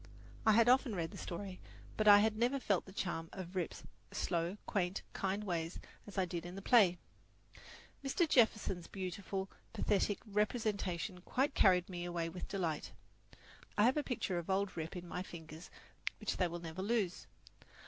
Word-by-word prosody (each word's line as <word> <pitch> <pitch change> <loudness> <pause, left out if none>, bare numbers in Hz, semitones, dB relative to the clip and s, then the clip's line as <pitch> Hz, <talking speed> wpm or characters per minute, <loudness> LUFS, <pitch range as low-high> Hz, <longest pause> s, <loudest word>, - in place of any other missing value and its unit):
I 220 - +8
had 230 +2 +6
often 250 -3 +4
read 165 -2 -2
the - - -9
story, 185 +1 -5 0.4
but 215 - +1
I 205 0 +10
had 215 0 +2
never 245 +5 +2
felt 200 -7 +1
the 190 - -11
charm 170 -4 -3
of 185 -1 -7
Rip's 180 -3 -2 0.3
slow, 175 +2 -1
quaint, 185 -1 -1
kind 195 +2 -1
ways 170 -4 -2 0.3
as 205 - -10
I 190 - +3
did 170 -1 -4
in 175 +1 -7
the 195 - -6
play. 200 -8 +6 1.1
Mr. 300 +5 +2
Jefferson's, 215 - +3
beautiful, 190 +1 -4 0.3
pathetic 205 0 +1
representation 200 -5 -1
quite 270 +9 0
carried 180 -2 +5
me 175 -2 -5
away 170 -1 -2
with 180 +2 -6
delight. 170 -6 -2 0.8
I 205 - +5
have 250 +4 +5
a 300 - +2
picture 210 -10 -1
of 170 - -8
old 195 +1 +1
Rip 165 +2 -4
in 175 -1 -6
my 180 - -3
fingers 160 -2 -9 0.5
which - - -2
they 180 - +3
will 170 0 -5
never 170 +2 -6
lose. 200 -3 0
190 Hz, 170 wpm, -36 LUFS, 175-210 Hz, 1.1 s, I